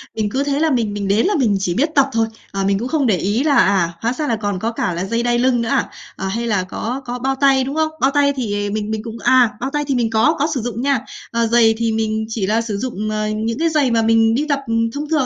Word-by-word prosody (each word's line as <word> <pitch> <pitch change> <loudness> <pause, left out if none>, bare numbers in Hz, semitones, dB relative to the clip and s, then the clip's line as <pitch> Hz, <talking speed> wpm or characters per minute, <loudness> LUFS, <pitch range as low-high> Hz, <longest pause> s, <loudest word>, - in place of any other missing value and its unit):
mình 215 -1 -1
cứ 275 +2 0
thế 285 0 -1
là 320 +1 +2
mình 230 -6 0
mình 205 -1 -3
đến 205 +3 +2
là 410 - +1
mình 225 -9 +2
chỉ 180 -2 -1
biết 285 - +1
tập 275 -1 +4
thôi, 225 -2 +1 0.2
à, 195 0 -2
mình 195 0 +1
cũng 240 - -3
không 295 -1 0
để 205 -5 +2
ý 205 +9 0
là, 295 -2 +2
à, 190 -6 +3
hóa 235 +2 0
ra 300 +3 -3
là 230 - +1
còn 205 -3 -3
có 225 +4 -2
cả 200 -6 -2
là 175 +2 -3
dây 230 +4 -1
đai 240 0 +1
lưng 250 -1 +2
nữa 230 - -2
à? - - +1 0.3
À, 195 - -4
hay 230 +5 -2
là 200 -5 +1
có 235 +7 -4
có 245 0 -4
bao 270 +2 -1
tay, 270 -1 +3
đúng 275 +3 -4
không? 315 0 +1
Bao 270 - +3
tay 280 0 +2
thì, 205 -6 -2
à, - - -3
mình 215 0 -3
mình 220 -1 -3
cũng 230 -1 -7
à, 250 -3 +5
bao 265 - -2
tay 295 0 0
thì 275 - 0
mình 235 -2 +1
có, 225 +9 +3
có 290 - +2
sử 260 - -2
dụng 235 +1 -4
nha, 275 -1 +1 0.3
ờ, 235 0 +1
giày 225 -1 +4
thì 230 0 0
mình 220 0 -1
chỉ 220 -4 -2
là 220 +3 +2
sử 220 -3 -4
dụng, 215 -2 -3
ờ, 215 0 -1
những 220 +2 -2
cái 330 +1 +2
giày 295 -5 +1
mà 230 -1 +2
mình 225 0 +3
đi 290 +5 0
tập 285 -1 +1 0.3
thông 295 +1 -5
thường 305 -5 +2
230 Hz, 305 wpm, -19 LUFS, 215-270 Hz, 0.3 s, à